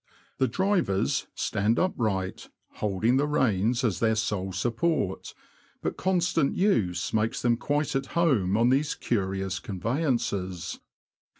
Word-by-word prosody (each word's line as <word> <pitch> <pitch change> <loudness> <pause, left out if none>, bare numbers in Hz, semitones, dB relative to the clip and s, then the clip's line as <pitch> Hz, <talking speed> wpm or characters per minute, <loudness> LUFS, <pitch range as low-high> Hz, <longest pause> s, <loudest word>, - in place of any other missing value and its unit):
The 130 - +3
drivers 180 - 0
stand 105 +3 0
upright, 105 - -1 0.3
holding 105 +5 +1
the 145 +2 +2
reins 120 -3 +1
as 110 -7 0
their 110 -1 +2
sole 100 -3 -1
support; 115 - -1 0.5
but - - -1
constant 175 -5 +1
use 115 - +1
makes 110 +1 0
them 120 -1 +3
quite 145 +4 -1
at 135 0 -1
home 110 - +3
on 115 +2 +4
these 140 +3 +1
curious 95 -4 -2
conveyances. 100 - -2
115 Hz, 120 wpm, -27 LUFS, 95-145 Hz, 0.5 s, on